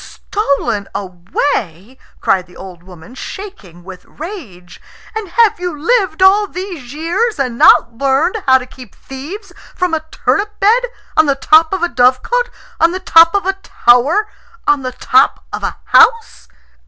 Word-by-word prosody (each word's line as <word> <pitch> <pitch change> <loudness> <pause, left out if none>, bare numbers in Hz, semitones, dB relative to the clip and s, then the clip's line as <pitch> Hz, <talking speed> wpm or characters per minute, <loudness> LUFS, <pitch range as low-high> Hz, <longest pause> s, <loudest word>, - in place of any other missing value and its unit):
"Stolen 280 - -3
away?" 190 - -4 0.2
cried 185 -2 0
the 180 - -17
old 185 -3 -11
woman, 180 +3 -15
shaking 255 - -10
with 185 0 -12
rage. 270 - -10 0.3
"And 435 -4 -5
have 450 +1 +2
you 355 -4 -5
lived 375 -2 +1
all 405 +2 +4
these 360 -10 -8
years 340 +10 -2
and 255 -4 -2
not 235 0 +5
learned 280 +10 0
how 260 0 +6
to 250 - -7
keep 255 -4 -15
thieves 290 +11 -10 0.2
from 360 -2 -1
a 315 -1 -1
turnip 415 +5 -2
bed, 460 +5 +3 0.3
on 315 - +4
the 280 - +2
top 315 +3 +3
of 380 -3 -2
a - - +3
dovecot, 260 - +1 0.3
on 330 +1 +3
the 370 - -4
top 335 -1 +5
of 400 - 0
a 385 - +1
tower, 280 - +2 0.4
on 290 -1 +2
the 255 -1 -5
top - - +1
of - - -4
a - - -4
house? 455 0 +3
310 Hz, 160 wpm, -15 LUFS, 245-390 Hz, 0.4 s, how